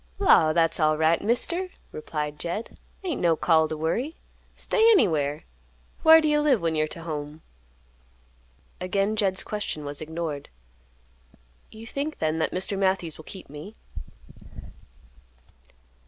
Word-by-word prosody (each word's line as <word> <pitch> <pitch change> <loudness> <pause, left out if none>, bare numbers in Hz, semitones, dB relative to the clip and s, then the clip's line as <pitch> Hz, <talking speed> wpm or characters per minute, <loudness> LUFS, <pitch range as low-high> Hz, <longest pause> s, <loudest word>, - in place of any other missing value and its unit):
"Law, 170 - +5
that's 165 +1 +2
alright, 155 +1 +3
Mister!" 335 - 0 0.2
replied 150 -1 -5
Jed. 175 +8 -5 0.2
"Ain't 350 -6 -3
no 170 -2 +3
call 160 -1 +3
t' 155 - -4
worry. 230 - -2 0.4
Stay 450 0 +3
anywhere. 155 - +2 0.6
Whar 320 0 +9
do 310 - +1
you 300 0 +3
live 285 -6 +3
when 165 -2 -1
you're 155 0 +1
to 165 +2 -7
home?" 150 -1 -6 1.4
Again 195 +3 0
Jed's 195 -3 +1
question 205 -8 -4
was 145 0 -5
ignored. 155 -2 -5 1.2
"You 220 +1 -11
think 280 +6 -4
then 160 0 -1
that - - +1
Mr. 190 +2 0
Matthews 190 -5 0
will 160 - -11
keep 190 - -10
me?" 150 +9 -10
170 Hz, 130 wpm, -25 LUFS, 155-225 Hz, 1.4 s, Whar